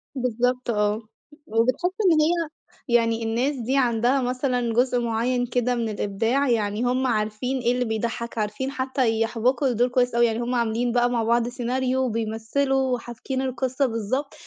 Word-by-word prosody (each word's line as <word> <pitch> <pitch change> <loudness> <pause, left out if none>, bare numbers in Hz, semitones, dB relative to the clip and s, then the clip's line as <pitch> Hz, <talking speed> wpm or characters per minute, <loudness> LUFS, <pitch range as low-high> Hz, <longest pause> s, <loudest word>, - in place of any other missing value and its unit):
بالضبط 250 0 -1
آه، 210 -1 +1 0.5
وبتحس 250 +11 +1 0.2
إن 310 -1 +4
هي 330 0 +1 0.4
يعني 230 -1 +2
الناس 240 +6 0
دي 255 +2 -1
عندها 245 +1 +2
مثلًا 250 -2 -1
جزء 245 +1 +2
معيّن 240 +2 0
كده 245 0 0
من 230 -2 -1
الإبداع، 225 +7 0
يعني 215 -1 0
هُم 255 +1 +1
عارفين 220 +3 -1
إيه 240 0 +1
اللي 250 0 0
بيضحّك، 230 +1 -3
عارفين 215 +6 -2
حتى 260 -4 0
يحبكوا 245 +5 +1
الدور 245 0 +2
كويس 245 -1 +1
أوي، 235 - +5
يعني 225 -1 0
هُم 245 +1 -1
عاملين 235 +1 0
بقى 245 0 +2
مع 235 -2 0
بعض 235 +1 +2
سيناريو 255 +1 -1
وبيمثّلوا 250 +4 0
وحابكين 240 +2 -5
القصة 260 +1 -1
بالضبط، 250 +4 -2
245 Hz, 160 wpm, -24 LUFS, 225-255 Hz, 0.5 s, أوي